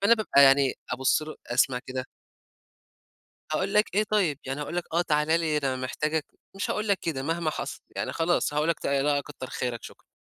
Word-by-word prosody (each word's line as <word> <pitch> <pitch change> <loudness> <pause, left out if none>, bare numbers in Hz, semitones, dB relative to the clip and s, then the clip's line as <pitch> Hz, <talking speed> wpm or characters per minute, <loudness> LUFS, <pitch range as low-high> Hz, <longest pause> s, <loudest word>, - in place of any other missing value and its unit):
فأنا 225 +4 +6
بابقى 210 -10 +4
يعني 135 -1 +5 0.2
أبُصّ 130 +4 +2
له، 155 0 -7
أسمع 125 +1 +2
كده. 130 0 -4 1.5
هاقول 190 +5 -1
لك 210 -3 +3
إيه 210 +2 +3
طيب! 195 -9 +1
يعني 135 +2 -4
هاقول 150 +4 -4
لك 175 - -1
آه 170 - +3
تعالَ 150 -3 +1
لي 155 -2 +1
ده 135 -3 -1
أنا - - -4
محتاجك، 155 +4 -1 0.3
مش 195 - -2
هاقول 215 0 -1
لك 200 -2 +3
كده، 150 -6 -3
مهما 165 +2 -1
حصل، - - -5 0.2
يعني - - -2
خلاص 165 -2 +1
هاقول 150 +2 +1
لك 170 - +1
ت - - -4
لأ 140 +1 +2
كتّر 130 - -8
خيرك 125 -2 -3
شكرًا، - - -12
150 Hz, 205 wpm, -27 LUFS, 135-175 Hz, 1.5 s, فأنا